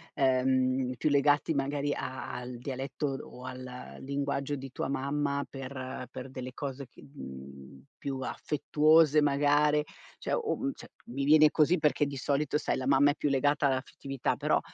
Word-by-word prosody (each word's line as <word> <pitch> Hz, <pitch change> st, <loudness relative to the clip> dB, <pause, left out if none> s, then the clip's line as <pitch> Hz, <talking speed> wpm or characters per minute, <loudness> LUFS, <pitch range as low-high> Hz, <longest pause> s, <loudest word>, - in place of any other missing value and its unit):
ehm, 130 Hz, -1 st, +2 dB
più 155 Hz, -, +1 dB
legati 145 Hz, +2 st, +3 dB
magari 140 Hz, +1 st, -1 dB
a 130 Hz, 0 st, -5 dB
al 125 Hz, 0 st, -6 dB
dialetto 135 Hz, +3 st, -4 dB, 0.2 s
o 125 Hz, +1 st, -11 dB
al 125 Hz, 0 st, -8 dB
linguaggio 140 Hz, +1 st, -2 dB
di 135 Hz, -1 st, -7 dB
tua 130 Hz, -, -3 dB
mamma 140 Hz, +1 st, -1 dB
per 130 Hz, -1 st, -6 dB
per 130 Hz, 0 st, -7 dB
delle 130 Hz, -1 st, -7 dB
cose 140 Hz, -1 st, -5 dB
che -, -, -17 dB
mhmm, 70 Hz, -, -11 dB
più 135 Hz, -1 st, -4 dB
affettuose 150 Hz, +2 st, +3 dB
magari, 145 Hz, +1 st, +3 dB, 0.4 s
cioè -, -, -1 dB
o 455 Hz, -2 st, -1 dB
mhmm, 275 Hz, +1 st, -1 dB
cioè -, -, -12 dB, 0.2 s
mi 135 Hz, +4 st, -4 dB
viene 155 Hz, +2 st, +7 dB
così 160 Hz, +3 st, +4 dB
perché 150 Hz, 0 st, +2 dB
di 140 Hz, -1 st, -5 dB
solito 140 Hz, +2 st, 0 dB
sai 150 Hz, -, -1 dB
la 130 Hz, -, -3 dB
mamma 140 Hz, +1 st, +5 dB
è -, -, -5 dB
più 145 Hz, -, -1 dB
legata 145 Hz, +1 st, +2 dB
all'affettività, 135 Hz, 0 st, -2 dB
però -, -, +2 dB
140 Hz, 165 wpm, -30 LUFS, 130-145 Hz, 0.4 s, viene